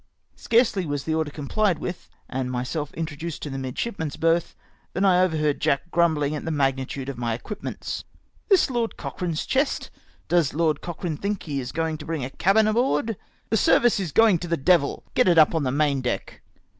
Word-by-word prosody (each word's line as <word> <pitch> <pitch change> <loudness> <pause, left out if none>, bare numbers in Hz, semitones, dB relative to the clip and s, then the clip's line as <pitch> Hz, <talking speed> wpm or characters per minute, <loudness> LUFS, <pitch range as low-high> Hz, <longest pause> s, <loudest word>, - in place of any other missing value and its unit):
Scarcely 220 -6 +2
was 145 -1 -2
the 160 - -1
order 160 -1 0
comphed 170 +6 0
with, 180 +3 -6 0.2
and 130 -1 -3
myself 135 +4 -3
introduced 160 0 -5
to 150 - -4
the 135 - -4
midship 135 - -4
man's 155 -3 -3
berth, 165 +1 +1 0.4
than 190 +3 +1
I 180 -2 +5
overheard 155 -5 +1
Jack 155 +5 0
grumbling 155 -4 +2
at 150 - -5
the - - -3
magnitude 135 -2 -1
of 135 -3 -5
my 115 -2 -1
equipments. 200 - -6 0.2
" - - -38
This 375 -8 +4
Lord 235 -2 -1
Cochrane's 170 -4 -3
chest? 275 +2 0 0.4
Does 170 -6 +2
Lord 160 -1 +1
Cochrane 170 -3 -4
tliink 200 0 -2
he 145 -4 -3
is 125 -1 -5
going 160 -1 -2
to 150 - -8
bring 160 -5 -2
a 130 - -7
cabin 205 +7 +3
aboard? 220 - +1 0.4
The 220 - +3
service 240 +1 +4
is 180 -5 -3
going 220 -4 +5
to 175 - -5
the 170 0 0
devil! 145 0 +2
Get 250 - +3
it 175 -2 +4
up 155 0 +6
on 160 - +1
the 130 -2 0
main 140 -1 +1
deck." 125 - -4
160 Hz, 200 wpm, -24 LUFS, 145-185 Hz, 0.4 s, up